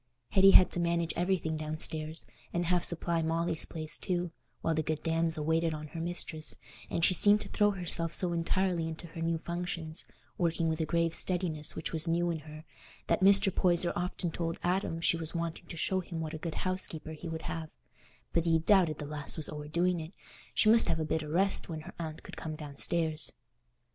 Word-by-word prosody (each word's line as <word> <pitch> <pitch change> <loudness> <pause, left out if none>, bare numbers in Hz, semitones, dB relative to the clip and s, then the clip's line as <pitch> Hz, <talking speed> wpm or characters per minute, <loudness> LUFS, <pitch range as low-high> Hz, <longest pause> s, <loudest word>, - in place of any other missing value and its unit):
Hetty 195 0 +7
had 185 -1 +8
to - - -2
manage 170 -1 +1
everything 175 -3 0
downstairs, 155 +1 -2 0.3
and 175 0 -1
half 175 0 +2
supply 170 -1 +1
Molly's 165 0 -1
place 155 -1 -4
too, 175 -2 -1 0.3
while 165 - +1
that 155 -1 -1
good 155 -1 -1
damsel 165 -1 0
waited 160 0 +1
on 155 0 -7
her 165 - -6
mistress, 165 -2 0 0.3
and 165 - +2
she - - +4
seemed 205 +3 +5
to - - -3
throw 205 0 +3
herself 175 -4 -1
so 175 0 +1
entirely 170 0 0
into 165 +1 -6
her 165 +1 -7
new 165 0 +1
functions, 170 -1 -4 0.4
working 165 -1 +1
with 160 0 -1
a 160 - -1
grave 170 -1 +1
steadiness 175 -5 +1
which 160 - -3
was 160 +1 +1
new 170 +1 +1
in 165 - -3
her, 155 +1 -11 0.4
that - - +1
Mr. 195 0 +6
Poyser 175 -1 +2
often 180 0 -2
told 165 0 -3
Adam 175 -2 0
she 170 - +3
was 165 0 -3
wanting 170 0 -3
to 170 - -7
show 190 +3 +1
him 170 -2 -5
what 160 0 -4
a 160 - -5
good 165 0 -4
housekeeper 185 -4 -2
he 160 +2 -7
would 160 0 -5
have; 160 -1 -4 0.6
but 170 0 +2
he 165 -1 +4
"doubted 165 -2 +3
the 150 - -5
lass 145 0 -4
was 155 - -2
o'erdoing 165 +4 0
it—she 175 +5 -3
must 225 +1 +6
have 160 - +1
a 155 - 0
bit 160 +1 0
o' 155 - -6
rest 190 +5 +1
when 160 -2 -4
her - - -10
aunt 160 -2 -5
could - - -9
come 155 -1 -5
downstairs." 155 +2 -1
165 Hz, 205 wpm, -31 LUFS, 160-175 Hz, 0.6 s, had